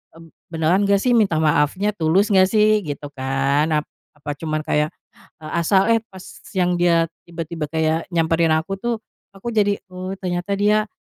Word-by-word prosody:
eee, 165 - -13 0.2
beneran 170 +5 +1
nggak 200 0 +2
sih 250 - +2
minta 210 -8 +3
maafnya? 155 +6 +1
Tulus 195 +3 +1
nggak 185 -1 +5
sih? 215 0 +3
Gitu 145 -5 -6
kan, 135 +3 0
ap 150 - +1 0.3
apa 150 0 -6
cuma 155 -1 -2
kayak, 150 0 +1 0.5
eee, 155 -1 -9
asal 190 +4 +3
eh 230 -1 +3
pas 190 -1 -11 0.3
yang 180 -2 +1
dia 170 -1 +3 0.2
tiba-tiba 165 -2 -5
kayak 160 +2 -1
nyamperin 165 -1 +2
aku 160 +5 0
tuh, 230 +3 -3 0.3
aku 205 +4 -7
jadi, 205 -2 +2 0.2
oh, 185 +1 -5
ternyata 180 +2 -2
dia, 210 +1 +2
175 Hz, 170 wpm, -21 LUFS, 155-200 Hz, 0.5 s, nggak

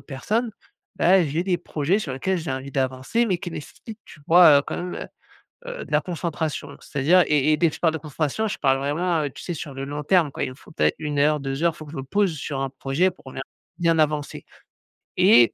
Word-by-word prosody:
personnes, 215 - -2 0.5
bah, 185 +1 +5
j'ai 155 +2 -1
des 180 -2 0
projets 165 +4 0
sur 145 -10 -4
lesquels 185 +8 -1
j'ai 160 -3 -5
envie 130 +1 -4
d'avancer, 130 - 0
mais 185 -4 +1
qui 175 0 -7
nécessitent, 210 +8 -9
tu 150 - -14
vois, 165 -4 +8
heu, - - -8
quand - - -4
même, 180 0 -5
heu - - -6 0.7
heu, - - -6
de - - -13
la - - +4
concentration. 160 -4 -4
C'est-à-dire 165 +6 +3
et 150 0 +3
et - - +4
dès 170 - +4
que 155 - -6
je - - -11
parle 165 -2 +3
de 160 - -3
concentration, 155 +7 -2
je 210 - -3
parle 135 -2 +2
vraiment, 155 +2 0
tu 135 - -11
sais, 175 - -4
sur 140 -2 -7
le 135 +1 -5
long 145 +2 -5
terme 165 -1 +3
quoi. - - -4
Il - - -4
me 130 - -10
faut - - -18
peut-être - - +1
1 150 -2 -3
heure, 150 +1 +3
2 135 +2 -4
heures, 170 -2 +2
faut 155 - -9
que 150 - -12
je - - -8
me 135 - -4
pose 195 +3 +1
sur 140 -2 -4
un 135 0 -2
projet 140 +7 0
pour 130 -6 -14
bien 130 - -5 0.4
bien 165 -2 +2
avancer 150 -1 -1 0.7
et 115 +1 +6
155 Hz, 245 wpm, -23 LUFS, 140-175 Hz, 0.7 s, vois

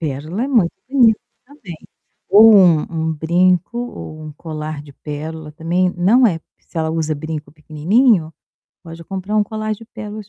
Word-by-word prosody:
Pérola 155 - -3
é - - -4
muito 225 -11 +2 0.2
bonito 240 -5 +4 0.2
também. 245 - -11 0.5
Ou 220 +2 +8
um 180 -7 +6
um 160 -1 -2
brinco 175 +6 +1
ou 200 -10 -7
um 155 - -8
colar 155 -1 -6
de 145 -1 -14
pérola 150 +2 -7
também, 175 +3 -1
não 210 +9 +4
é, 175 -8 +1 0.2
se - - -31
ela 160 -1 0
usa 160 -1 -1
brinco 155 0 -6
pequenininho, 160 - +1 0.5
pode 165 -1 -11
comprar 195 +3 -5
um 210 - +4
colar 215 +1 -4
de 225 - -14
pérolas 210 -2 -9
170 Hz, 165 wpm, -18 LUFS, 155-215 Hz, 0.5 s, Ou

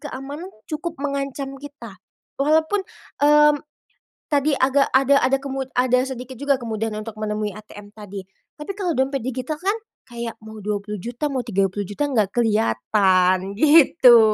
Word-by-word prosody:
keamanan 290 +5 -7 0.2
cukup 320 +2 -4
mengancam 275 -1 -3
kita, 270 -8 -11 0.4
walaupun, 315 +7 +2 0.4
mmm, 295 0 +6 0.7
tadi 290 0 +2
agak 275 +1 +3
ada 275 +1 +5
ada 270 +1 +3
kemud 270 -1 -4
ada 250 0 +3
sedikit 260 -1 -7
juga 285 -1 +2
kemudahan 220 -2 -3
untuk 220 0 -8
menemui 210 -1 -2
ATM 210 -1 -12
tadi. 205 -2 -8 0.4
Tapi 300 +6 -5
kalau 370 -4 -1
dompet 265 0 0
digital 260 +4 -3
kan 390 +3 +1 0.3
kayak 235 -1 -6
mau 220 0 -10
Rp20.000.000, 210 +6 -3
mau 265 - -1
Rp30.000.000, 200 +2 -1
enggak 215 -7 +1
kelihatan, 190 - +2
gitu. 285 -4 +7
255 Hz, 135 wpm, -22 LUFS, 215-285 Hz, 0.7 s, gitu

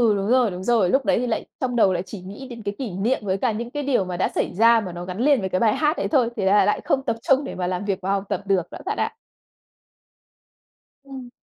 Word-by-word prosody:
đúng 195 0 -2
rồi, 250 -4 +3
đúng 180 +1 -6
rồi, 220 -4 +3
lúc 265 +5 +2
đấy - - +2
thì 250 - -1
lại 225 - -2 0.2
trong 250 -2 -1
đầu 195 -5 +4
lại 175 +1 -2
chỉ 205 - -9
nghĩ 205 +8 -9
đến 235 -3 -9
cái 205 0 -3
kỷ 245 -8 -4
niệm 205 +8 0
với 190 0 0
cả 240 +3 0
những 235 +3 -5
cái 290 +2 -3
điều 255 -9 +1
mà 180 -1 -4
đã - - +1
xảy - - 0
ra 230 +2 +5
mà 185 -3 -6
nó 175 0 -6
gắn 185 +2 -6
liền 285 +1 +4
với 190 -2 -3
cái 185 - 0
bài 220 -2 +3
hát 305 +1 +1
đấy - - -1
thôi, 250 -6 +3
thế 200 - -2
là 200 +2 +5
lại 210 - +1
không 270 -1 +1
tập - - 0
trung 270 +3 +3
để - - -6
mà 180 -1 -2
làm 185 +2 -3
việc 200 -1 -1
và 190 +1 -1
học 200 -1 0
tập 200 -1 -1
được 195 -2 +3
đó - - -7
bạn 420 +2 -2
ạ. - - -1 1.9
Ừm. 265 -3 -9
215 Hz, 285 wpm, -23 LUFS, 190-255 Hz, 1.9 s, ra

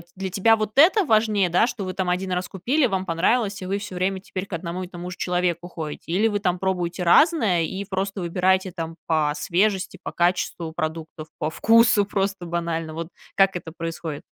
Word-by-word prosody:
для 190 0 -4
тебя 225 +4 +4
вот 215 -1 -2
это 375 +8 +6
важнее, 215 -5 +3
да, 180 +7 +3
что 215 - -4
вы 185 0 -4
там 185 -2 -2
1 185 +1 -1
раз 180 0 -1
купили, 255 - +1
вам 190 -2 -2
понравилось, 195 +4 +1
и - - -5
вы 195 +2 -1
всё 205 -2 -7
время 190 +1 0
теперь 185 -1 -5
к - - -10
одному 170 +2 -4
и 180 - -6
тому 175 0 -7
же - - -8
человеку 175 -1 -1
ходите? 160 -4 -7
Или 205 +5 +3
вы 205 - -1
там 180 -2 0
пробуете 180 -1 -1
разное 205 - +4
и 190 +4 -4
просто 195 0 -3
выбираете 185 +2 +1
там 165 -1 -5
по 155 -2 +1
свежести, 190 +5 0
по - - -5
качеству 175 -2 0
продуктов, 155 0 -4
по 155 - -1
вкусу 220 +2 +4
просто 195 -2 -2
банально, 170 -2 -3
вот 165 0 -5 0.3
как 195 -1 +4
это 165 -2 -9
происходит? 165 -3 -5
185 Hz, 200 wpm, -23 LUFS, 170-200 Hz, 0.3 s, это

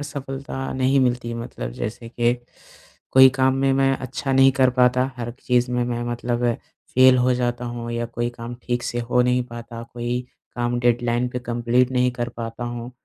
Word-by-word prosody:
असफलता 135 -2 -5
नहीं 130 +1 +2
मिलती 125 -2 0
है 115 - -4
मतलब। 115 - -6
जैसे 115 - -5
कि 120 0 +1 0.8
कोई 130 0 +9
काम 130 0 +3
में 135 0 +2
मैं 135 0 +3
अच्छा 135 +1 -4
नहीं 135 0 +6
कर 130 -1 +3
पाता, 125 +1 +3
हर 120 -1 -4
चीज़ 125 0 +1
में 125 0 0
मैं 120 0 -2
मतलब 120 0 -2 0.5
फ़ेल 130 0 +7
हो 125 +1 +3
जाता 120 0 -1
हूँ 120 -1 -5
या 115 0 -2
कोई 120 0 -2
काम 115 +1 -6
ठीक 120 0 -2
से 120 0 -2
हो 125 - +4
नहीं 125 0 +1
पाता, 115 -1 -8
कोई 120 +1 -3 0.4
काम 120 0 0
डेडलाइन 120 0 +1
पे 125 - -4
कम्प्लीट 120 +1 +1
नहीं 125 0 +2
कर 120 -1 -3
पाता 115 +1 -5
हूँ। 120 0 -5
125 Hz, 190 wpm, -22 LUFS, 120-130 Hz, 0.8 s, कोई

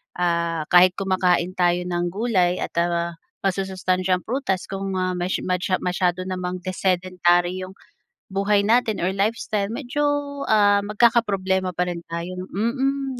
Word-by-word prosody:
ah, 170 -2 0
kahit 180 +1 +7
kumakain 185 -2 +1
tayo 175 0 +3
ng 175 -1 -1
gulay 190 -5 +1
at, - - -5
ah, 170 0 -1 0.3
masusustansyang 185 -1 0
prutas, 225 -7 -2
kung, 195 0 -3
ah, 185 0 0
mas 180 +2 -1
masya 185 0 -1
masyado 180 0 0
namang 180 -1 -4
desedentary 180 -1 +1
‘yong 185 +1 -8 0.6
buhay 200 +1 +2
natin 220 0 +2
or 185 - +1
lifestyle, 205 0 -1
medyo, 275 +3 -3 0.4
ah, 205 -2 +4
magkakaproblema 200 -5 +2
pa 180 - +1
rin 175 -1 -4
tayo, 170 +2 -5
mm, 265 +4 -1
185 Hz, 130 wpm, -23 LUFS, 180-205 Hz, 0.6 s, kahit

